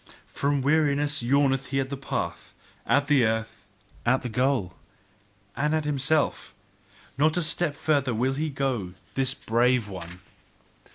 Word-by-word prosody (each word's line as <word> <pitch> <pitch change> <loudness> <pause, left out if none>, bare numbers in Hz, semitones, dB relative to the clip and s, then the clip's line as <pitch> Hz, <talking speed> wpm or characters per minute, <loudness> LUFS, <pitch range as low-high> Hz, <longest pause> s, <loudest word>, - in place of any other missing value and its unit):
From 140 -1 -1
weariness 145 -1 +2
yawneth 135 +1 +2
he 135 +1 -1
at 135 0 -2
the - - -2
path, 135 0 -5 0.3
at 145 0 +3
the 145 -3 +4
earth, 110 -2 -2 0.4
at 125 +3 +2
the 125 - -3
goal, 125 -5 0 0.8
and 150 +2 +1
at 155 -1 -1
himself: 150 +1 0 0.6
not 155 +3 +3
a 175 - +2
step 155 -1 +1
further 140 -5 +1
will 130 +4 +1
he 155 +3 -2
go, 130 -10 -2 0.2
this 135 0 0
brave 120 0 +1
one! 90 -2 -9
135 Hz, 145 wpm, -26 LUFS, 120-145 Hz, 0.8 s, the